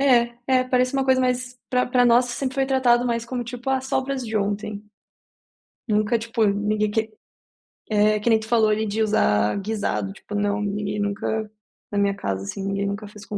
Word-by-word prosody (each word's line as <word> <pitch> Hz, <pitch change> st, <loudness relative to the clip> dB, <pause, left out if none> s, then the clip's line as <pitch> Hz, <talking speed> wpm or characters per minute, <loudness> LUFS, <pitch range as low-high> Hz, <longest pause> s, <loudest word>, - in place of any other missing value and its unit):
É, 240 Hz, -3 st, +4 dB
é, 255 Hz, -1 st, +3 dB
parece 255 Hz, 0 st, +1 dB
uma 270 Hz, -1 st, +1 dB
coisa 260 Hz, -1 st, +3 dB
mais 250 Hz, 0 st, -1 dB
pra 250 Hz, -1 st, +2 dB
pra 250 Hz, 0 st, +3 dB
nós 240 Hz, +1 st, +5 dB
sempre 260 Hz, +2 st, -3 dB
foi 270 Hz, -1 st, +1 dB
tratado 250 Hz, -2 st, +3 dB
mais 235 Hz, -1 st, -1 dB
como, 245 Hz, +1 st, -3 dB
tipo: 245 Hz, +2 st, -6 dB
"Ah, 265 Hz, 0 st, +2 dB
sobras 265 Hz, 0 st, -2 dB
de 220 Hz, 0 st, -2 dB
ontem". 205 Hz, 0 st, -2 dB, 1.1 s
Nunca, 215 Hz, +1 st, +2 dB
tipo, 230 Hz, 0 st, 0 dB
ninguém 210 Hz, +1 st, +1 dB
que 220 Hz, +1 st, -1 dB, 0.8 s
É, 215 Hz, 0 st, +3 dB
que 210 Hz, -, 0 dB
nem 225 Hz, -1 st, +5 dB
tu 220 Hz, -, -9 dB
falou 220 Hz, -2 st, +3 dB
ali 215 Hz, +1 st, +1 dB
de 215 Hz, +2 st, 0 dB
usar 105 Hz, -, +2 dB
guisado, 200 Hz, -1 st, -2 dB
tipo, 210 Hz, -, -11 dB
não, 205 Hz, 0 st, 0 dB
ninguém 205 Hz, 0 st, -2 dB
nunca 210 Hz, +1 st, -2 dB, 0.4 s
na 205 Hz, -, -2 dB
minha 200 Hz, 0 st, +2 dB
casa, 95 Hz, -, -3 dB
assim, 195 Hz, -, -5 dB
ninguém 195 Hz, 0 st, -1 dB
nunca 200 Hz, +1 st, -4 dB
fez 210 Hz, 0 st, -13 dB
com 205 Hz, -, -4 dB
220 Hz, 195 wpm, -23 LUFS, 205-250 Hz, 1.1 s, nós